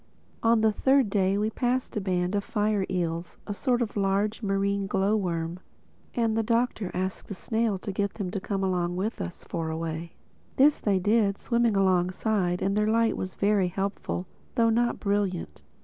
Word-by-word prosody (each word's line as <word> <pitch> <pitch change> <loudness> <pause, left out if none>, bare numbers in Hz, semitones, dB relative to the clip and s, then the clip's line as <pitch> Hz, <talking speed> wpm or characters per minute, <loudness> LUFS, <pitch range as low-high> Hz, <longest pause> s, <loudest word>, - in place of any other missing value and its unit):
On 230 -1 +4
the 220 0 +4
third 265 0 +3
day 195 -1 +2
we 215 +1 0
passed 250 +2 -1
a 210 - 0
band 180 -1 0
of 200 -1 0
fire 210 -2 0
eels, 170 -2 -2
a 205 - -3
sort 245 +3 +1
of 220 - -6
large, 205 +2 0
marine 200 -1 0
glow 195 +1 +2
worm; 170 -3 -2 0.6
and 230 -3 +1
the 225 - +2
Doctor 230 -3 0
asked 185 +1 -3
the 200 - -6
snail 220 +1 0
to 200 - -5
get 200 +1 -2
them 190 -4 -3
to 200 - -2
come 185 -3 -1
with 205 +5 -2
us 175 - -6
for 165 -1 -3
a 160 - -3
way. 165 0 -4 0.4
This 285 +2 +5
they 200 -3 +2
did, 205 +1 +2
swimming 235 -3 +1
alongside; 185 0 +1
and 195 +1 +1
their 210 0 +2
light 225 +1 +3
was 185 -1 -5
very 200 -2 +2
helpful, 195 0 -3 0.3
though 230 -1 +4
not 240 +1 +1
brilliant. 200 - -1
200 Hz, 180 wpm, -27 LUFS, 185-220 Hz, 0.6 s, This